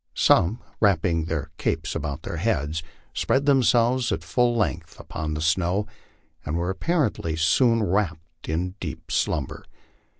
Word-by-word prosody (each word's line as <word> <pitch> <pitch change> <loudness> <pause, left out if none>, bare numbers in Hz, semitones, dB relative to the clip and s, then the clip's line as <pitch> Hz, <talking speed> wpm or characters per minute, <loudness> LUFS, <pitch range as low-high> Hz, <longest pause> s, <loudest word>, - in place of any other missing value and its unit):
Some, 95 +8 +4 0.2
wrapping 85 -5 +2
their 80 -2 -3
capes - - -1
about 75 +2 -4
their 85 - -5
heads, 80 -6 0 0.3
spread 135 +1 +1
themselves 125 -3 +3
at - - -2
full 120 -1 +1
length 110 - -2
upon 75 -1 -4
the 75 - -3
snow 90 +5 +1 0.6
and 75 +3 -2
were 90 +2 -1
apparently 115 - 0
soon 115 - +3
wrapt 85 -7 -2
in 90 +3 -1
deep 75 -6 -7
slumber. - - -1
90 Hz, 135 wpm, -25 LUFS, 80-115 Hz, 0.6 s, Some